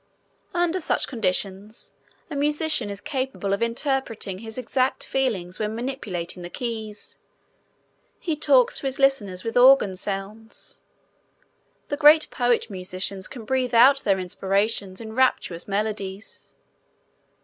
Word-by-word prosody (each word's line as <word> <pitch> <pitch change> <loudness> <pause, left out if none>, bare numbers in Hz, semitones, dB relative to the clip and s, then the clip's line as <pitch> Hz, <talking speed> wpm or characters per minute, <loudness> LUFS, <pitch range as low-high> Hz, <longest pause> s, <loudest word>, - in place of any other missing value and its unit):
Under 350 +1 +1
such - - 0
conditions 200 -1 -3 0.3
a 305 - -7
musician 295 -4 +1
is 200 -1 -6
capable 260 -5 -2
of 200 - -1
interpreting 230 -5 -2
his 220 +1 -9
exact 255 +1 0
feelings 205 -10 -1
when 215 0 -2
manipulating 210 -9 -4
the 175 - -7
keys. 220 -2 -6 1.0
He 325 -3 -2
talks 280 -5 +3
to 275 - -3
his 265 0 -2
listeners 215 -10 +1
with 230 - -4
organ 250 -6 +6
sounds. 200 +3 -5 1.1
The 290 - -2
great 305 +1 +6
poet 245 -2 +1
musicians 185 -1 -4
can 235 -4 -9
breathe 255 0 0
out 265 +4 +7
their 195 -7 +1
inspirations 195 +2 -1
in 220 -1 -7
rapturous 220 -9 +1
melodies. 205 -1 -4
225 Hz, 125 wpm, -24 LUFS, 195-265 Hz, 1.1 s, out